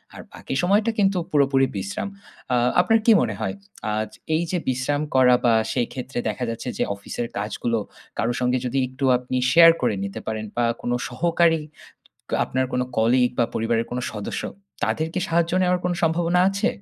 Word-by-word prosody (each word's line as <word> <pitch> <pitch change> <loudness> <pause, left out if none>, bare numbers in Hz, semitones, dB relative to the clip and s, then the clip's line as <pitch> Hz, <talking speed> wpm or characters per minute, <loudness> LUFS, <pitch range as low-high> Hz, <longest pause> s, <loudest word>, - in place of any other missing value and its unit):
আর - - -8
বাকি - - -6
সময়টা 205 +5 +3
কিন্তু 195 -1 +3
পুরোপুরি 135 -2 +3
বিশ্রাম। 95 - -4 0.5
আ - - +4 0.3
আপনার 225 +5 +3
কি 230 - +7
মনে - - -1
হয়? - - -2 0.4
আচ 110 0 -2 0.2
এই 165 - +1
যে 185 - +1
বিশ্রাম 130 +3 0
করা 125 -1 +6
বা 120 - +5 0.2
সেই 120 - 0
ক্ষেত্রে 130 0 -5
দেখা 110 +4 -4
যাচ্ছে 115 +2 -4
যে - - +1
অফিসের 110 +4 -5
কাজগুলো 110 +3 -1 0.4
কারো 120 +2 0
সঙ্গে 125 0 +1
যদি 125 +2 -2
একটু 130 +2 -4
আপনি 125 +1 -4
শেয়ার 165 0 +9
করে 120 -4 +1
নিতে 100 - -6
পারেন। 110 0 -3
বা 120 - +3 0.2
কোন 120 - -2 0.2
সহকারী, 165 +4 +2 0.8
আপনার 130 +1 -1
কোনো 125 - 0
কলিগ 125 +3 +3
বা 120 - +4
পরিবারের 115 0 0
কোন 125 - -3
সদস্য। 105 -2 -4 0.4
তাদের 160 - -1
কি 185 - 0
সাহায্য 170 0 +1
নেওয়ার 180 0 +2
কোন 180 - +1
সম্ভাবনা 170 +2 +2
আছে? 195 +1 0
130 Hz, 180 wpm, -23 LUFS, 120-170 Hz, 0.8 s, শেয়ার